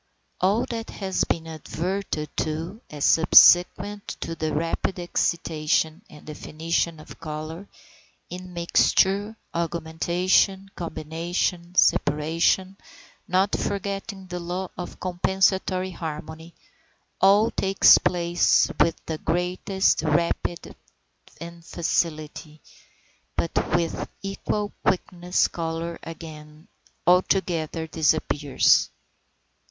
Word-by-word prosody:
All 205 +6 +2
that 230 -1 -5
has 190 -2 -2
been 165 -1 -2
adverted 160 0 -4
to 165 +8 -3
as 145 -2 -3
subsequent 180 +4 +5
to 165 - -4
the 155 -1 -3
rapid 165 +4 -1
excitation 160 -1 0
and 150 - -15
definition 160 +2 -2
of 155 - -13
colour, 160 +4 -6 0.6
immixture, 185 +3 +1 0.2
augmentation, 175 +4 0
combination, 170 +2 -3
separation, 165 +6 +2 0.5
not 190 +2 +2
forgetting 200 0 -4
the 180 -1 -6
law 180 +2 -4
of 180 - -7
compensatory 185 +1 0
harmony, 160 0 -7 0.7
all 200 +3 +5
takes 195 0 +5
place 175 -1 +2
with 165 - +4
the 160 -1 -4
greatest 180 +3 0
rapidity 170 +2 -1 0.6
and 170 0 -9
facility; 155 -2 -3 0.8
but 165 - -1 0.2
with 165 -1 -1
equal 205 +1 -3
quickness 180 -1 +1
colour 165 0 -4
again 155 -1 -11 0.4
altogether 175 -3 +1
disappears. 155 -3 +2
170 Hz, 90 wpm, -24 LUFS, 160-185 Hz, 0.8 s, subsequent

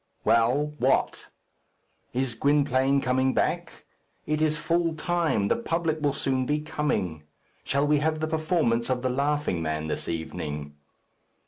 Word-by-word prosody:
"Well! 130 +6 +3
what?" 130 +2 +1 0.8
"Is 130 -1 -1
Gwynplaine 140 +1 +2
coming 130 +1 +1
back? - - -1 0.4
It 155 0 -1
is 155 -1 +2
full 165 +1 0
time. 160 - 0
The - - +2
public 165 -8 -1
will 145 -1 +2
soon 135 -3 -1
be 150 - +1
coming. 105 - -2 0.4
Shall 140 +1 +1
we 150 0 +3
have 155 +1 0
the 155 - -1
performance 155 -7 0
of 125 -1 -1
'The 130 - +1
Laughing 140 - 0
Man' 80 -1 -2
this - - -3
evening?" 75 -3 -4
140 Hz, 140 wpm, -26 LUFS, 120-155 Hz, 0.8 s, Well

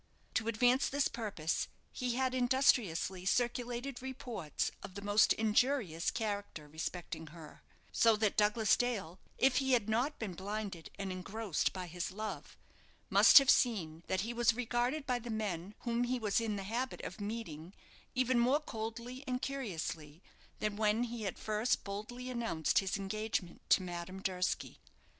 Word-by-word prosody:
To 220 - 0
advance 245 +4 +3
this 285 0 +2
purpose, 205 -9 -2 0.2
he 250 -1 -2
had 260 0 +1
industriously 245 -8 +2
circulated 245 +4 -1
reports 245 - -3
of 185 - -9
the 200 - -5
most 205 +1 +4
injurious 220 - +1
character 205 -8 -3
respecting 160 +1 -5
her; 155 0 -12 0.3
so 225 -1 +5
that 215 -1 +1
Douglas 210 0 +4
Dale, 200 -8 -2 0.2
if 265 -1 +4
he 265 -2 +2
had 230 -4 +3
not 245 +7 +1
been 210 -5 -4
blinded 195 -2 -5
and 195 -1 -3
engrossed 195 +1 -1
by 185 -1 -5
his 175 0 -4
love, 215 +3 -6 0.5
must - - +9
have 275 -2 +9
seen 170 -10 +1
that 190 0 0
he 230 +4 -3
was 235 -1 +3
regarded 250 +4 0
by 250 -3 0
the 240 0 -8
men 205 -3 -3
whom 235 0 0
he 255 +1 0
was 220 -1 +1
in 220 -2 -1
the 200 - -4
habit 240 +6 -3
of - - -7
meeting 200 -7 -5 0.4
even 255 -1 +3
more 255 +5 +4
coldly 235 0 -6
and 250 0 -2
curiously 170 - -4 0.3
than 210 -1 -2
when 215 +2 +2
he 235 -2 -4
had 195 - -3
first 215 +3 0
boldly 215 +5 -6
announced 230 -10 +1
his 195 -1 -1
engagement 200 -2 -3
to 185 - +5
Madame 175 +1 -5
Durski. 185 -1 -2
220 Hz, 155 wpm, -34 LUFS, 190-245 Hz, 0.5 s, must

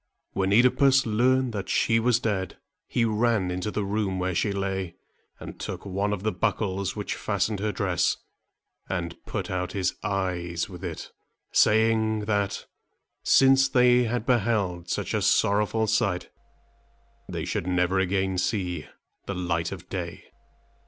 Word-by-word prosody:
When 95 -1 0
OEdipus 130 +4 +5
learned 125 +3 +2
that 100 -3 -4
she 115 -1 +3
was 120 0 +3
dead, 100 -6 -2 0.3
he 120 - +1
ran 110 -4 +1
into 90 +3 -2
the 105 -1 -2
room 100 -2 -1
where 90 0 -1
she 100 +5 0
lay, 95 -3 -3 0.4
and - - -9
took - - -6
one 100 +1 -1
of 100 -2 -3
the 110 - +1
buckles 100 -1 -1
which 105 -1 -3
fastened 100 0 -1
her 105 +1 -1
dress 90 -2 0 0.7
and 85 -1 -3
put - - -4
out 90 0 -2
his 95 -3 0
eyes 90 -4 -2
with 95 -1 -11
it, 85 -4 -6 0.4
saying, 110 0 +3
that, 105 -2 -1 0.6
since 135 0 +5
they 125 -1 +4
had 120 0 -2
beheld 100 -8 0
such - - -2
a - - +1
sorrowful 105 +2 +2
sight, 110 -4 0 1.0
they - - -4
should 85 - -2
never 90 +1 +2
again 95 0 0
see 90 -1 -2 0.4
the 100 - -3
light 85 -2 -1
of 90 -2 -8
day. 85 -4 -5
100 Hz, 145 wpm, -26 LUFS, 90-110 Hz, 1.0 s, OEdipus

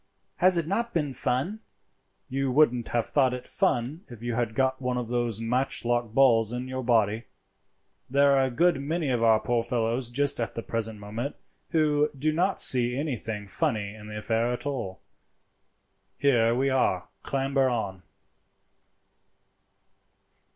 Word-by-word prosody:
Has 185 -1 +6
it 170 - 0
not 230 +7 -2
been 145 -5 0
fun?" 135 - -1 0.7
"You 135 0 -1
wouldn't 125 -4 +3
have 120 -2 0
thought 130 -3 +2
it 125 - -9
fun 135 +9 -1
if 120 -2 -11
you 120 0 -2
had 115 -1 -1
got 130 +1 +1
one 125 -1 -1
of 120 -2 -4
those 120 -3 -1
matchlock 120 0 0
balls 115 -3 +4
in 125 +1 -4
your 130 0 -4
body. 110 -2 +2 0.8
There 140 +1 +4
are 135 -1 +3
a - - -1
good 160 +3 +2
many 155 0 -1
of 120 -2 0
our 110 -1 +5
poor 120 0 0
fellows 115 +1 -1
just 140 +1 0
at 115 - -3
the 115 - -4
present 110 -1 -3
moment 110 +7 -5 0.3
who 150 -2 +2
do 155 +3 0
not 185 +5 +1
see 125 -1 +3
anything 115 -8 -3
funny 105 -3 -2
in 105 -1 -11
the 105 0 -7
affair 115 +2 0
at 125 - -4
all. 120 -10 -4 1.2
Here 120 -4 +3
we 135 +2 +1
are; 95 -9 +1
clamber 135 -1 0
up." 100 -6 -3
125 Hz, 155 wpm, -27 LUFS, 115-140 Hz, 1.2 s, Has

